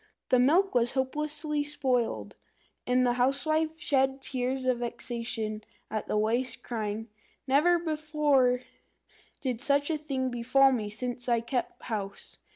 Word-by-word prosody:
The 255 - +5
milk 335 +10 +4
was 240 -1 +2
hopelessly 300 +2 -1
spoilt, 260 -5 -1 0.5
and 250 0 +3
the 245 - +3
housewife 310 +6 +1
shed 270 -3 +1
tears 260 0 -2
of 255 -2 +2
vexation 235 -2 -4 0.3
at 215 -1 -3
the - - 0
waste, 230 +3 0
crying, 220 -1 -3 0.4
"Never 300 +7 +4
before 300 -6 +2 0.8
did 250 -4 -2
such 285 +3 +2
a 310 - -1
thing 265 -4 -2
befall 255 +3 +4
me 220 -5 -1
since 245 +3 -4
I 235 -1 +3
kept 240 +2 -3
house! 200 -4 -5
255 Hz, 135 wpm, -29 LUFS, 240-290 Hz, 0.8 s, The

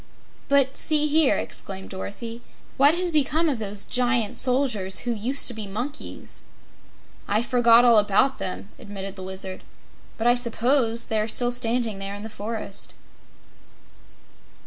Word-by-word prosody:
"But 275 -1 +3
see 300 -1 +2
here!" 300 -1 +3
exclaimed 190 -1 -5
Dorothy. 225 +5 -6 0.3
"What 285 +4 +5
has 355 0 0
become 310 +2 +2
of 275 -7 -1
those 205 -1 -3
Giant 240 -3 0
Soldiers 250 -8 +2
who 245 - -2
used 240 +6 +1
to 245 - +1
be 220 -2 -6
monkeys?" 245 +9 -7 0.9
"I 215 +3 +1
forgot 240 -1 +5
all 235 -3 +7
about 210 +6 +2
them!" 185 +2 -5
admitted 195 -1 -7
the 190 - -9
Wizard; 190 0 -6 0.5
"but 225 - -3
I 240 - +6
suppose 240 0 +1
they 220 - -1
are 215 - 0
still 245 +2 0
standing 235 -3 0
there 195 +1 -5
in 205 - -8
the 220 - -6
forest." 215 -1 -6
230 Hz, 145 wpm, -24 LUFS, 205-260 Hz, 0.9 s, all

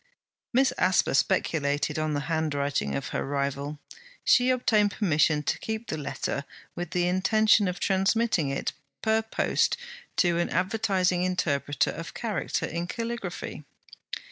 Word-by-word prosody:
Miss 260 +1 +3
Asper 185 - +3
speculated 145 +2 +1
on 155 -1 0
the 145 - -1
handwriting 145 - -1
of 70 - -3
her - - -2
rival. 140 +1 -2 0.5
She 250 0 +5
obtained 220 -5 +3
permission 155 -6 +2
to - - -1
keep 220 +1 -4
the - - -3
letter, 140 0 -3 0.3
with 175 -1 -4
the 175 +1 +1
intention 210 +3 +4
of 180 0 -3
transmitting 195 -4 +2
it 135 - -2 0.3
per 220 0 +3
post 220 - +1 0.4
to 175 -2 +3
an 175 - 0
advertising 185 -2 +1
interpreter 155 -6 0
of 165 +1 -8
character 225 -3 -2
in 170 +1 -3
caligraphy. 230 -8 -5
175 Hz, 135 wpm, -27 LUFS, 150-215 Hz, 0.5 s, She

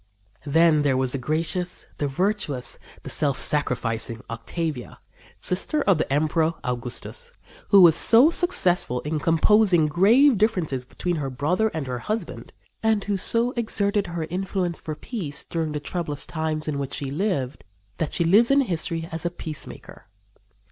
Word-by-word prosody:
Then 160 +1 +4
there 140 -3 +2
was 130 -1 0
the 135 - -2
gracious, 165 +6 -2
the 145 - 0
virtuous, 145 - -1 0.2
the - - -7
self 145 -4 0
sacrificing 115 -5 0
Octavia, 125 +4 -4 0.4
sister 240 +11 -1
of 195 -5 +3
the 155 - -2
Emperor 155 +3 +1
Augustus, 125 - -4 0.4
who 200 -2 +7
was 165 -3 +7
so 245 - +6
successful 180 - +1
in 150 +1 -2
composing 175 +1 +4
grave 215 - +4
differences 175 - 0
between 175 +5 -3
her 140 -3 -3
brother 155 - 0
and 160 -9 -4
her 125 -1 -4
husband, 215 - -5 0.3
and 220 -2 +1
who 205 - -1
so 230 +5 +1
exerted 205 -4 0
her 170 -2 -4
influence 185 -2 -2
for 155 - -6
peace 155 - -4
during 165 -2 -3
the 150 - -3
troublous 150 -1 -4
times 155 -1 -3
in 145 -2 -2
which 140 -1 -4
she 135 -2 -4
lived 145 -6 -2 0.4
that 160 - -2
she 170 - +2
lives 205 +8 +5
in 275 +1 +5
history 165 -6 -2
as 165 0 -4
a 175 - 0
peacemaker. 160 -3 -8
165 Hz, 155 wpm, -24 LUFS, 145-200 Hz, 0.4 s, who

